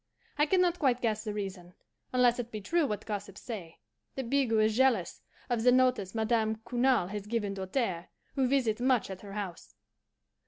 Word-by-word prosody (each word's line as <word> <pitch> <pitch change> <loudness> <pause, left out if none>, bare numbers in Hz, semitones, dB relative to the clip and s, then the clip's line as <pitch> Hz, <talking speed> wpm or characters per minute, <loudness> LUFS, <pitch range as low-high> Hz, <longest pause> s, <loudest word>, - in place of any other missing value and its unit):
I 295 +1 +3
can 370 +3 +3
not 355 -1 +1
quite 255 -4 +2
guess 220 -3 -1
the 215 - -3
reason, 185 -4 -6 0.4
unless 250 -1 +3
it 240 -1 -3
be 215 - -4
true 325 - +1
what 210 -1 -4
gossips 205 -2 -5
say, 185 -9 -7 0.4
that 265 -3 -4
Bigot 265 -5 +2
is 215 0 +3
jealous 245 -8 +2 0.3
of 240 -2 0
the 250 +2 +5
notice 250 -6 +2
Madame 220 0 +1
Cournal 245 -6 +2
has 205 -1 -5
given 210 -3 -1
Doltaire, 190 -2 -2 0.3
who 265 -2 +1
visits 245 -4 +1
much 250 -5 +2
at 190 - -7
her 200 -1 -9
house. 195 -5 -6
225 Hz, 185 wpm, -30 LUFS, 205-255 Hz, 0.4 s, the